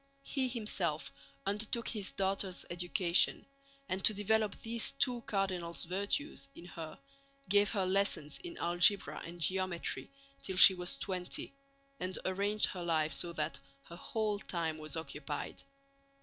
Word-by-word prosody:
He 265 -1 -1
himself 205 - -1 0.3
undertook 215 +3 0
his 205 -4 -2
daughter's 195 -1 0
education, 175 0 +2 0.4
and 190 +1 -2
to 215 - +6
develop 210 0 +1
these 230 0 +1
two 250 -3 +1
cardinal 185 -4 -1
virtues 200 - -1
in 170 - -11
her 165 -3 -8 0.5
gave 205 0 +4
her 195 -4 0
lessons 185 -6 +1
in 345 -1 -8
algebra 175 +4 +4
and 175 +1 -9
geometry 185 +1 0 0.3
till 190 - -5
she 190 - +10
was 180 +8 -2
twenty, 185 +1 -3 0.5
and 185 0 -1
arranged 200 +3 +2
her 180 - -5
life 160 -2 +1
so 175 - +3
that 150 -3 -2 0.3
her 170 - -9
whole 210 +2 -2
time 165 -5 -3
was 155 +1 -4
occupied. 150 -2 -5
190 Hz, 135 wpm, -33 LUFS, 170-210 Hz, 0.5 s, she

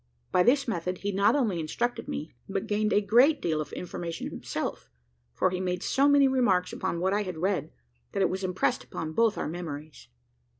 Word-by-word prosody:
By 180 - +4
this 270 +7 +3
method, 180 -4 -2
he 200 +2 -2
not 200 +5 +3
only 220 -11 +1
instructed 235 +10 -2
me, 155 - -5 0.2
but 195 +1 -2
gained 215 0 0
a 205 - +4
great 245 +9 +5
deal 155 -2 0
of 150 - -7
information 170 -1 -5
himself; - - -4 0.4
for 120 - +1
he 180 - -2
made 180 0 -2
so 275 +1 +3
many 285 -1 +6
remarks 220 -9 +2
upon 170 - -2
what 190 +2 +1
I 205 - +2
had 185 -5 -5
read, 185 +3 -1 0.4
that 195 - +1
it - - +3
was 190 +1 -3
impressed 185 0 0
upon 160 -1 -5
both 225 +3 +2
our - - -2
memories. 155 -2 -7
190 Hz, 200 wpm, -28 LUFS, 175-225 Hz, 0.4 s, many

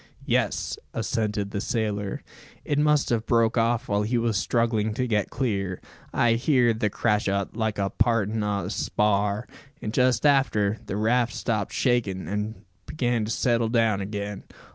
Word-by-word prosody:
"Yes," - - 0 0.2
assented 105 -2 -1
the 100 - -2
sailor. 105 -4 -2 0.4
"It 145 -1 0
must 150 -1 +3
have 115 -2 0
broke 115 -2 +3
off 115 0 +1
while 100 0 +1
he 115 +4 0
was 115 -2 0
struggling 110 0 +1
to 125 - 0
get 105 -4 0
clear, 100 -8 -2 0.3
I 120 -1 +3
heerd 120 -2 +2
the 105 - +1
crash 105 0 0
o't, 100 +1 -2
like 110 -2 -1
the 100 -1 -1
partin' 110 -1 +1
o' 100 -3 -1
a 95 - -4
spar; 105 +1 0 0.3
and 105 - -5
just 125 0 +2
after, 115 -7 +3
the 100 - -3
raft 120 +2 +1
stopped 105 -4 -2
shakin', 105 - 0
an' 105 +3 -4 0.2
began 120 -6 0
to 110 - -4
settle 115 -1 +1
down 115 -4 +2
again. 100 0 -5
110 Hz, 165 wpm, -25 LUFS, 105-120 Hz, 0.4 s, must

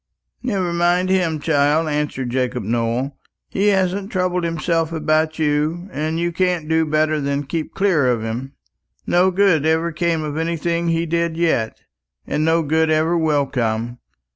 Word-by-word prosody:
"Never 195 -8 -1
mind 175 +2 +2
him, 175 -5 +1
child," 150 +1 +2
answered 145 -4 -2
Jacob 125 -2 -1
Nowell. 120 +5 -1 0.3
"He 200 +2 0
hasn't 195 +1 +1
troubled 180 -3 0
himself 165 0 -1
about 155 0 0
you, 155 +4 0
and 155 +1 -2
you 175 0 0
can't 175 -2 0
do 160 0 +2
better 155 0 +1
than 140 +1 -1
keep 155 +2 -4
clear 185 -9 +2
of 120 -3 +1
him. 120 +5 -4 0.5
No 180 +2 +3
good 185 -5 +3
ever 160 +2 +1
came 165 0 0
of 150 0 -4
anything 170 +1 -1
he 165 0 +1
did 170 0 -1
yet, 160 -10 0 0.4
and 150 - -1
no 165 +1 +2
good 160 +2 +1
ever 155 +2 +2
will 155 -4 +2
come. 120 -2 -2
160 Hz, 160 wpm, -20 LUFS, 145-170 Hz, 0.5 s, No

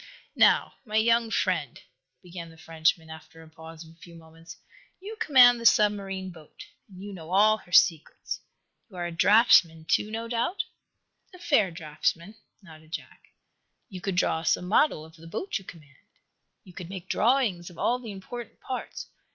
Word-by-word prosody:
"Now, - - +4
my 215 -4 -7
young 230 +1 +3
friend," - - -1 0.4
began 175 -2 -9
the 165 - -17
Frenchman, 160 -1 -1
after 160 +1 -13
a - - -16
pause 160 0 -12
of 160 - -16
a 165 - -23
few 170 0 -14
moments, 165 0 -14 0.4
"you 410 +4 -8
command 250 - +6
the - - -7
submarine 195 -3 +1
boat, 160 -3 -14 0.2
and 190 -1 -12
you 205 0 -8
know 165 -3 -10
all 210 +4 +4
her 175 - -20
secrets. 165 -3 +2 0.5
You 195 - -16
are 175 -1 -4
a 175 - -4
draughtsman, 170 -3 +4
to, 210 - +1
no 225 +1 -5
doubt?" 240 - -2 0.7
"A - - -12
fair 290 - +2
draughtsman," 165 +3 -3 0.3
nodded 160 -2 -16
Jack. - - -9 0.6
"You 185 -2 -9
could 195 -1 -3
draw 170 -2 +1
us 165 - +1
a - - -9
model 180 - +1
of 160 0 -17
the 165 +1 -14
boat 290 - -4
you 195 - -17
command. 150 -7 -14 0.7
You 180 - -16
could 175 -1 -9
make 185 -1 -8
drawings 220 -9 +1
of 175 - -16
all 245 +1 0
the 230 -4 -8
important 225 +5 -9
parts. 255 - -6
185 Hz, 175 wpm, -26 LUFS, 165-220 Hz, 0.7 s, command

